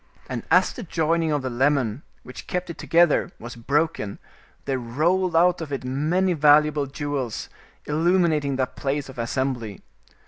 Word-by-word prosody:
And - - -4
as - - +4
the - - -7
joining 165 -3 0
of 145 -2 0
the 130 - -2
lemon, 130 -2 +1 0.2
which 125 - -10
kept 180 -1 -3
it 165 - -12
together, 170 -2 +3
was 120 +1 -9
broken, 140 -3 -1 0.5
there 135 -2 -1
rolled 165 +9 0
out 175 +1 +4
of 155 -3 -6
it 135 -2 -3
many 155 +9 0
valuable 150 -1 +4
jewels, 140 -4 -4 0.4
illu 165 +5 +2
minating 150 -6 +1
that 130 -1 -2
place 140 0 -2
of 130 -2 -10
assembly. 120 -4 -3
145 Hz, 160 wpm, -24 LUFS, 130-165 Hz, 0.5 s, as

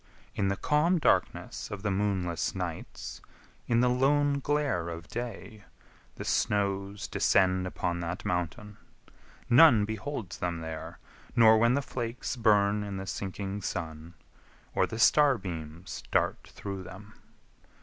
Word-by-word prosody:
In 100 - 0
the 100 - +1
calm 155 +9 +2
darkness 160 - 0
of 105 -1 -6
the 105 - 0
moonless 95 -4 -1
nights, - - -6 0.5
In 115 0 +3
the 125 - +4
lone 140 +3 +2
glare 140 - 0
of 85 0 -7
day, 110 -3 -6 0.5
the - - -7
snows 100 0 0
descend 95 -1 +2
Upon 85 -1 -2
that 85 +1 -4
Mountain; 90 +4 -3 0.7
none 120 -4 +7
beholds 110 -1 -5
them 85 -2 -2
there, 80 -1 -6 0.4
Nor 110 -2 +7
when 120 +2 +4
the 140 - 0
flakes 120 0 -4
burn 105 -3 +3
in 100 -1 -5
the 95 - -5
sinking 100 +1 -4
sun, 80 -2 -5 0.6
Or - - +2
the 110 - -6
star 140 +3 +5
beams 85 -2 -7
dart - - 0
through 100 -2 -6
them. 95 +3 -11
100 Hz, 135 wpm, -29 LUFS, 90-120 Hz, 0.7 s, none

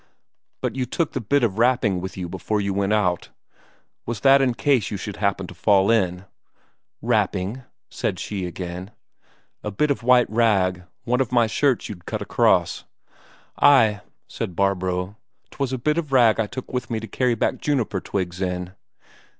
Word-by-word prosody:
"But - - -2
you 130 -2 -2
took 165 +5 -1
the 130 - -2
bit 140 +5 +1
of 110 -2 0
wrapping 115 -6 +2
with 95 0 -6
you 90 -2 -4
before 95 +4 -2
you 100 -1 -1
went 100 +1 0
out 90 -5 +1 0.7
was 120 -2 -5
that 135 0 +6
in 125 -3 +1
case 115 -1 +1
you 105 - -4
should 100 0 -6
happen 100 -2 0
to 90 - -10
fall 100 +3 +3
in?" 95 -4 +1 0.8
"Wrapping?" 105 0 0 0.3
said - - -3
she 95 -3 -4
again. 90 +1 -6 0.7
"A 105 - -2
bit 145 +9 0
of 140 - -1
white 125 0 +4
rag 95 -6 +1 0.2
one 125 +1 +1
of 130 -2 -2
my 120 -2 +4
shirts 130 +3 +1
you'd 90 -5 -10
cut - - -3
half - - -4
across." - - +2 0.8
"Ay," 110 -8 +5 0.3
said 90 - -5
Barbro, 95 0 -1 0.3
"'twas 135 -2 -3
a 130 - -1
bit 150 +6 0
of 155 -5 -5
rag 120 -5 +4
I 110 - +1
took 130 +4 -8
with 125 -3 -3
me 115 - -1
to 110 - -7
carry 125 0 0
back - - -1
juniper 125 -10 -1
twigs 90 -2 -4
in." 90 -1 -2
105 Hz, 180 wpm, -23 LUFS, 95-125 Hz, 0.8 s, that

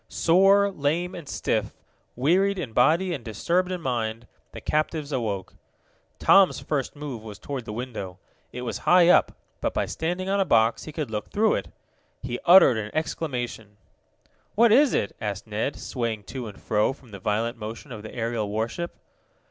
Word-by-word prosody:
Sore, 195 +4 +4
lame 170 +3 -1
and 170 -5 -9
stiff, - - -1 0.4
wearied 185 +10 +2
in 140 -11 -5
body 170 +10 +3
and 135 -7 -5
disturbed 170 - 0
in 180 -1 -3
mind, 115 -4 -2 0.3
the - - -8
captives 155 -1 -1
awoke. 110 -8 -3 0.6
Tom's 195 -1 +5
first 145 -3 -3
move 145 -6 -6
was 105 -2 -9
toward 135 0 -6
the - - -6
window. 110 -6 -6 0.3
It 125 - -6
was 120 - -4
high 180 -1 +7
up, 180 - +5 0.3
but, - - -2
by - - +1
standing 180 +3 -3
on 200 +1 +1
a - - +4
box, 115 -9 +2
he 155 - -7
could 150 -6 -4
look 105 -1 -4
through 215 +1 +2
it. - - -2 0.6
He 125 -1 -4
uttered 175 -9 +7
an 105 -1 -3
exclamation. 120 -9 -3 0.8
"What 230 +1 +5
is 275 +3 +5
it?" 100 - -1
asked 105 -2 -4
Ned, 110 +6 -2
swaying 115 -4 -3
to 130 -4 -5
and 105 - -10
fro 105 +4 +1
from 130 -4 -19
the 100 - -8
violent 110 +5 -1
motion 115 +6 -7
of 110 -3 -7
the 110 - -9
aerial 115 -3 -2
warship. 115 +11 -3
130 Hz, 175 wpm, -25 LUFS, 110-175 Hz, 0.8 s, high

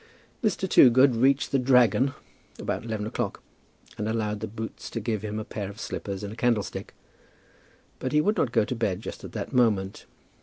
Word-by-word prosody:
Mr. 190 -3 0
Toogood 130 -4 +6
reached 135 +4 +2
the 135 - +3
"Dragon" 125 +1 +4 0.4
about - - -3
eleven 110 -2 -3
o'clock, 110 -2 -3 0.6
and 105 +1 -1
allowed 105 -2 -1
the 110 - -4
boots 110 +1 -7
to 115 - -4
give 110 -2 -2
him 105 0 -4
a 110 - -4
pair 100 -3 -5
of 100 +2 -11
slippers 100 -3 -5
and 100 +1 -5
a - - -9
candlestick. 115 -3 -1 1.0
But 130 - -3
he 150 - +4
would 210 +8 +2
not 120 - +1
go 110 - +3
to 125 - -3
bed 105 -5 -1
just - - -8
at - - -9
that - - -5
moment. 105 -6 +1
115 Hz, 190 wpm, -26 LUFS, 105-125 Hz, 1.0 s, Toogood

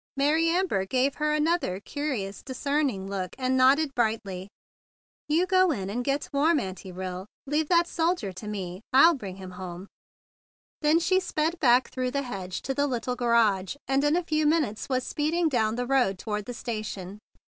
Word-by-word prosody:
Mary 310 +4 +3
Amber 345 - +1
gave 255 +7 +1
her 300 0 -1
another 300 - +1
curious, 235 -6 -4
discerning 270 -6 -1
look, 190 -2 -4
and 260 0 0
nodded 270 +3 +4
brightly. 210 -6 -1 0.8
"You 330 +4 +3
go 370 0 +4
in 200 -10 -2
and 245 +4 -2
get 275 +2 -1
warm, 300 +3 +3
Auntie 190 -3 -6
Rill. 185 +1 -6 0.2
Leave 295 +2 0
that 345 -1 +4
soldier 330 - -1
to 200 +4 -9
me; 190 -3 -5
I'll 325 +6 +7
bring 200 - -6
him 190 -1 -9
home." 180 0 -7 1.0
Then 305 +1 +4
she 355 +3 +3
sped 330 -2 -1
back 250 -2 +4
through 255 -1 -1
the 280 +2 -2
hedge 190 -7 -5
to 270 - -2
the 285 +1 +1
little 250 -1 -2
garage, 230 -5 +2
and 270 +1 +2
in 295 +2 +3
a 355 - +1
few 310 -2 +1
minutes 295 -10 0
was 255 -1 0
speeding 320 +3 0
down 225 -5 +1
the 245 +1 -2
road 245 -7 +2
toward 210 0 -4
the 245 - -6
station. 210 -4 -5
255 Hz, 180 wpm, -27 LUFS, 200-300 Hz, 1.0 s, I'll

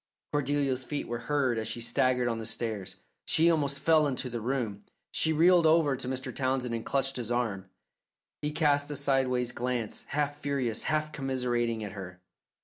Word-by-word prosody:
Cordelia's 140 -2 +1
feet 145 +3 -3
were 120 0 -3
heard 135 -6 +2
as 110 - -3
she 110 +2 -2
staggered 125 +1 +1
on 115 -1 -1
the 110 - -5
stairs. 110 -3 -3 0.3
She 165 +2 +4
almost 140 -4 0
fell 155 0 +4
into 130 -2 -3
the 120 -1 -3
room. 115 -4 -2 0.3
She 160 - +1
reeled 170 +1 +5
over 155 -3 +4
to 130 -1 -6
Mr. 130 0 -3
Townsend 130 -2 0
and 115 -1 -2
clutched 135 -1 0
his 120 -3 -3
arm. 105 -6 -1 0.7
He 150 - -1
cast 145 -2 +2
a 145 - -3
sidewise 130 -3 +1
glance, 120 -2 -3
half 145 0 -1
furious, 135 -6 -1
half 155 0 0
commiserating 125 -5 -1
at 105 - -5
her. 90 -2 -8
130 Hz, 175 wpm, -29 LUFS, 120-145 Hz, 0.7 s, reeled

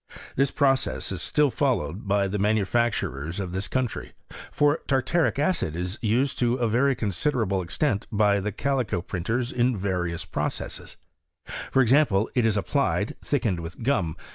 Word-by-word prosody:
This 135 +1 +3
procesE 135 -2 +1
is - - -3
still 150 -2 +2
followed 110 - -1
by 100 0 +2
the 100 +2 -2
manufacturers 100 - 0
of 95 -3 -3
this 95 +3 -2
countfT; 130 -3 -2 0.4
for 145 +1 +3
tartaric 145 +5 +1
acid 145 - 0
is 90 +3 -3
used 120 +5 +1
to 120 0 +2
a 120 -2 +1
rery 125 +4 +2
considerable 105 - 0
extent 105 - -1
by 105 -1 +3
the 105 +2 -2
callco 120 -7 -1
printerB, 115 +8 -2
in 125 -1 +2
various 90 -3 -2
processes; - - -4 0.5
for 135 - 0
example, 120 -5 +3
it 120 -3 +3
is 105 -1 +1
ap 100 - -1
plied, - - 0
thickened 95 -6 0
with 85 +6 -7
gum. 95 - +1
110 Hz, 155 wpm, -26 LUFS, 95-130 Hz, 0.5 s, This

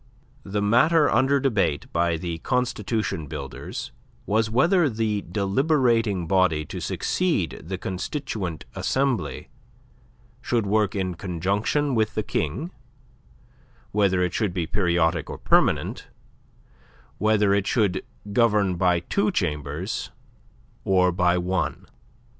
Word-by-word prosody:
The 100 -2 -2
matter 145 +9 +4
under 135 +3 +3
debate 105 - +1
by 85 0 +1
the 85 0 -4
constitution 110 - -1
builders 70 0 -6 0.3
was 110 +1 +1
whether 160 - +3
the 110 -3 -1
deliberating 115 - +1
body 85 -4 +2
to - - -6
succeed 155 - -1
the 95 +3 -4
Constituent 95 - -4
Assembly 135 -6 -1 0.9
should 120 -3 0
work 105 0 +1
in 95 -2 -1
conjunction 100 - -1
with 110 -2 0
the 110 - 0
King, 105 - -2 1.2
whether 95 -3 +2
it 90 - -1
should 105 -5 -1
be 85 -3 0
periodic 85 -3 +1
or - - -5
permanent, - - +1 1.1
whether 105 -1 +3
it 100 -1 +1
should 100 -5 +1 0.3
govern 105 -5 +3
by 90 -1 +2
two - - 0
chambers 75 +9 -2 0.7
or 90 -2 +3
by 90 0 +2
one. 90 -4 -2
100 Hz, 115 wpm, -24 LUFS, 90-115 Hz, 1.2 s, matter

